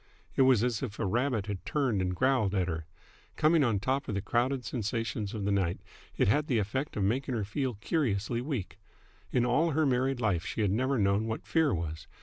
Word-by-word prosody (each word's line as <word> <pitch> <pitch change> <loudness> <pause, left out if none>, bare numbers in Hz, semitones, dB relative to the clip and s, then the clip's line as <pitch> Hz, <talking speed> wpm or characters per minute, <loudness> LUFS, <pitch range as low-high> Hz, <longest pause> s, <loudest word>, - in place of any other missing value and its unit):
It - - +3
was 130 -4 +5
as 120 -3 0
if 110 -6 -4
a - - -1
rabbit 120 +1 0
had 100 -3 -5
turned 130 -10 0
and 90 0 -1
growled 125 -4 +2
at 90 -2 +1
her. 80 -2 -4 0.5
Coming 155 0 +4
on 115 -6 +2
top 135 +6 -1
of 105 - -2
the 100 - -1
crowded 125 +3 0
sensations 115 -2 -3
of 105 -2 -3
the 100 - +1
night, 95 -3 0 0.4
it - - +3
had 145 +9 +2
the 125 - +1
effect 110 +8 -2
of 100 - +1
making 125 +6 0
her 110 - -1
feel 125 +4 -2
curiously 115 - -1
weak. 125 - -4 0.5
In 120 -1 +2
all 155 +7 +2
her 155 +1 +2
married 130 0 +1
life 100 -8 +1
she - - -3
had 100 -3 +2
never 130 +6 +1
known 100 +1 +2
what 110 0 -4
fear 160 -3 +2
was. 80 -2 -4
115 Hz, 215 wpm, -30 LUFS, 100-130 Hz, 0.5 s, was